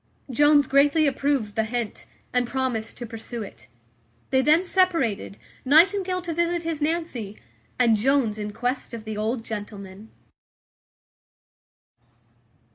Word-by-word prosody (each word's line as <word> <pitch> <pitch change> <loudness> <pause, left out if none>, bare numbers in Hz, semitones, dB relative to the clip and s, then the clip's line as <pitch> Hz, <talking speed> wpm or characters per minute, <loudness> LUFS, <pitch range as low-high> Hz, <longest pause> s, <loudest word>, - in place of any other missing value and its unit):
Jones 290 +2 +5
greatly 285 +4 +3
approved 275 -6 0
the 220 - +1
hint, 230 -1 -4 0.3
and 250 -1 +1
promised 245 -4 -2
to 240 - -6
pursue 225 0 -6
it. 115 - -12 0.6
They 260 - +4
then 310 +6 +4
separated, 335 - +1 0.3
Nightingale 365 +5 +3
to 340 -2 -3
visit 340 +1 0
his 325 -2 -3
Nancy, 295 -10 -2 0.4
and 235 -3 +4
Jones 230 -1 +1
in 210 0 -4
quest 245 +3 -3
of 225 - -8
the 215 -1 -5
old 225 +3 -2
gentleman. 205 -1 -8
255 Hz, 120 wpm, -24 LUFS, 220-305 Hz, 0.6 s, Jones